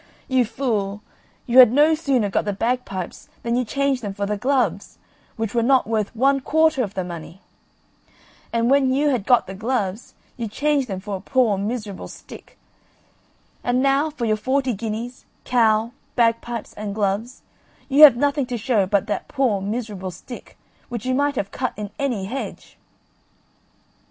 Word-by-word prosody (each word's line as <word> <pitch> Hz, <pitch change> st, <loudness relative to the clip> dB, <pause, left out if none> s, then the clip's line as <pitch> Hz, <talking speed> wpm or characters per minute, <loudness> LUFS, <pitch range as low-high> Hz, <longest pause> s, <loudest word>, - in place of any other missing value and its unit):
You 260 Hz, -2 st, +2 dB
fool, 210 Hz, -4 st, -2 dB, 0.4 s
you 235 Hz, -, -5 dB
you 260 Hz, -, +8 dB
had 245 Hz, -3 st, +9 dB
no 295 Hz, +5 st, +5 dB
sooner 275 Hz, -9 st, +1 dB
got -, -, 0 dB
the 205 Hz, -, -1 dB
bagpipes 225 Hz, -4 st, -3 dB
than 235 Hz, 0 st, 0 dB
you 250 Hz, -, +1 dB
changed 275 Hz, +2 st, 0 dB
them 200 Hz, -3 st, -5 dB
for 200 Hz, -, -2 dB
the 210 Hz, +1 st, -1 dB
gloves, 225 Hz, -5 st, -1 dB, 0.4 s
which 225 Hz, -2 st, -3 dB
were 235 Hz, -, +2 dB
not 260 Hz, +2 st, +3 dB
worth 220 Hz, 0 st, -2 dB
one 275 Hz, +4 st, +3 dB
quarter 315 Hz, +1 st, +2 dB
of 205 Hz, -4 st, -3 dB
the 190 Hz, -, -1 dB
money; 170 Hz, 0 st, -8 dB, 1.1 s
and 235 Hz, +2 st, +1 dB
when 275 Hz, -2 st, +4 dB
you 290 Hz, +3 st, +2 dB
had 240 Hz, -7 st, -1 dB
got 245 Hz, -2 st, +4 dB
the 190 Hz, -, -8 dB
gloves, 215 Hz, -1 st, -3 dB, 0.2 s
you 235 Hz, -2 st, -3 dB
changed 285 Hz, +4 st, 0 dB
them 190 Hz, -3 st, -5 dB
for 205 Hz, 0 st, -4 dB
a -, -, -12 dB
poor 235 Hz, -1 st, +2 dB
miserable 205 Hz, 0 st, -4 dB
stick; -, -, -13 dB, 1.1 s
and 250 Hz, +2 st, +1 dB
now 275 Hz, +3 st, +2 dB
for 290 Hz, -6 st, -4 dB
your 215 Hz, -1 st, +1 dB
forty 260 Hz, +3 st, 0 dB
guineas, 225 Hz, +4 st, -5 dB, 0.2 s
cow, 225 Hz, -2 st, +2 dB, 0.2 s
bagpipes, 230 Hz, -1 st, 0 dB
and 205 Hz, -1 st, -5 dB
gloves, 215 Hz, +4 st, -2 dB, 0.4 s
you 280 Hz, +2 st, +3 dB
have 295 Hz, -6 st, +11 dB
nothing 285 Hz, 0 st, +1 dB
to 245 Hz, -1 st, -3 dB
show 215 Hz, -3 st, +1 dB
but 200 Hz, 0 st, +1 dB
that 210 Hz, -, -3 dB
poor 250 Hz, -8 st, 0 dB
miserable 205 Hz, -2 st, -4 dB
stick, 185 Hz, +8 st, -11 dB, 0.3 s
which 235 Hz, -2 st, -5 dB
you 255 Hz, -, 0 dB
might 285 Hz, +2 st, +1 dB
have 200 Hz, -5 st, -3 dB
cut 255 Hz, -1 st, -2 dB
in 210 Hz, -1 st, -5 dB
any 245 Hz, -9 st, -1 dB
hedge." 255 Hz, +7 st, -6 dB
235 Hz, 170 wpm, -22 LUFS, 205-260 Hz, 1.1 s, have